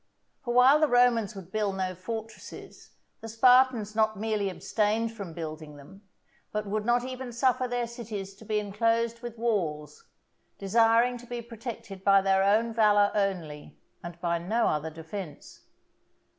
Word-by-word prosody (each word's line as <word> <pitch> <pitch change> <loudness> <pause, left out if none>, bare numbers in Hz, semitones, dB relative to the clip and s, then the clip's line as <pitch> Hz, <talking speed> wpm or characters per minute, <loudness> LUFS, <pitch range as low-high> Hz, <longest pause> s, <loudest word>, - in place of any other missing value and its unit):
For 240 - -3
while 255 +4 +6
the 310 - +4
Romans 245 -4 +3
would 190 -2 -10
build 205 -2 -1
no 185 -1 -2
fortresses, 220 +5 -9 0.3
the 225 - -9
Spartans 245 -2 +4
not 215 -1 +1
merely 210 -1 -1
abstained 215 +4 -1
from 200 -6 -8
building 155 -2 -7
them, 185 +8 -15 0.5
but 210 0 -3
would 210 +1 -3
not 240 0 +2
even 255 -1 -6
suffer 255 +1 +1
their 245 -1 -2
cities 220 -5 -7
to 220 - -14
be 215 0 -1
enclosed 230 +3 0
with 240 -2 -7
walls; 200 - -2 0.5
desiring 230 +4 +3
to 245 - -14
be 240 0 -5
protected 230 -4 -8
by 195 0 +6
their 190 0 +2
own 220 +4 +2
valour 205 -2 +4
only, 180 -8 -3 0.3
and 170 0 -8
by 170 -1 0
no 215 +8 0
other 155 +1 -2
defence. 160 0 -9
215 Hz, 155 wpm, -28 LUFS, 195-235 Hz, 0.5 s, while